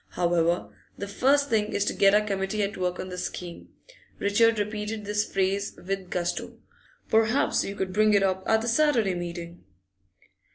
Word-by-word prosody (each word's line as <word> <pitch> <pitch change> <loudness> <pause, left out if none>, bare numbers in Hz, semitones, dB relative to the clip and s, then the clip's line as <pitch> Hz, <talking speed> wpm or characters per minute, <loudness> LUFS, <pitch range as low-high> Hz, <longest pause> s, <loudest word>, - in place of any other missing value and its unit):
However, 170 0 0 0.2
the 200 - -5
first 275 +7 +2
thing 215 -1 +1
is 205 - +1
to - - 0
get 195 0 +4
our 210 0 +3
committee 195 +1 -1
at 200 +1 -3
work 180 -1 -2
on 185 - -5
the 180 0 -6
scheme.' 175 -1 -6 0.5
Richard 225 +3 +3
repeated 210 +1 -3
this 210 +1 -1
phrase 195 +1 -1
with 195 -2 -3
gusto. 175 -1 -3 0.5
'Perhaps 220 +3 +2
you 200 - -5
could 190 -2 -3
bring 215 +1 +4
it 200 - +4
up 190 -1 +1
at 220 0 +3
the - - -3
Saturday 235 -6 +2
meeting? 175 -1 -6
200 Hz, 170 wpm, -26 LUFS, 185-215 Hz, 0.5 s, get